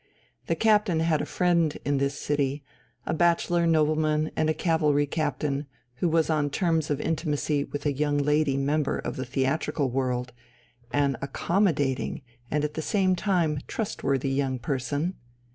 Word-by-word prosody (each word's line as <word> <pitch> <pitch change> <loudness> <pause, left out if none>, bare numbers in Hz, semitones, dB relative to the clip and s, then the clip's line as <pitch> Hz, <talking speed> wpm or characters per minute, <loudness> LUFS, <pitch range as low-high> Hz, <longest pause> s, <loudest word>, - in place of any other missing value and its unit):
The - - +1
Captain 210 -6 +3
had 165 -2 +2
a - - -4
friend 170 -4 +1
in 145 -1 +1
this 140 0 -1
city, 145 -1 -1 0.4
a - - -1
bachelor 170 0 +2
nobleman 155 -1 +2
and 155 0 +1
a - - +3
cavalry 150 -3 +2
captain, 145 -1 -2 0.3
who 170 - +1
was 160 0 +2
on 150 -2 +1
terms 165 0 0
of 145 -1 0
intimacy 150 -2 -1
with 145 0 -6
a 145 - +2
young 145 +1 0
lady 145 -1 +2
member 145 +1 0
of - - -4
the 130 - -4
theatrical 135 +1 -1
world, 125 -1 -1 0.6
an 140 -1 +1
accommodating 145 -3 0 0.3
and 150 0 0
at 150 0 -2
the 160 - -3
same 185 +3 +2
time 170 -6 +1
trustworthy 140 - -1
young 135 -1 0
person. 145 +7 -2
150 Hz, 155 wpm, -26 LUFS, 140-165 Hz, 0.6 s, Captain